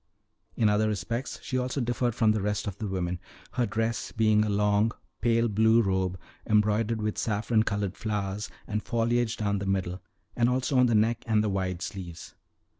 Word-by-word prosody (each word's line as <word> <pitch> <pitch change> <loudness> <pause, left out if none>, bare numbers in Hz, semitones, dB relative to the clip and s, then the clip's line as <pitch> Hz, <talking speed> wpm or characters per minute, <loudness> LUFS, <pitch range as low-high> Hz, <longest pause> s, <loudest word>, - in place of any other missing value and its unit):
In 110 - +3
other 105 +1 +3
respects 110 +6 -3 0.2
also 130 +2 0
she 120 - 0
differed 120 -1 0
from 110 -3 +4
the 110 -1 0
rest 105 +1 -1
of 100 - -4
the 110 - -3
women, 90 -2 -2 0.3
her 125 -2 0
dress 110 +2 -2
being 110 -1 +3
a 105 - -1
long, 105 +2 +2 0.3
pale 115 0 +3
blue 110 +2 +4
robe, 95 -3 0 0.3
embroidered 105 +1 +2
with 105 0 -1
saffron 110 +1 +1
colored 100 -2 -1
flowers 105 -1 -3 0.2
and 105 0 -2
foliage 120 0 0
down 100 -2 0
the 100 - -4
middle, 95 -1 -1 0.3
and 120 0 +3
also 130 +1 +1
on 125 - +6
the 115 - +2
neck 115 +2 +2
and 110 -1 +3
the 105 - 0
wide 95 -2 -2
sleeves. 90 -4 -7
110 Hz, 185 wpm, -28 LUFS, 100-115 Hz, 0.3 s, on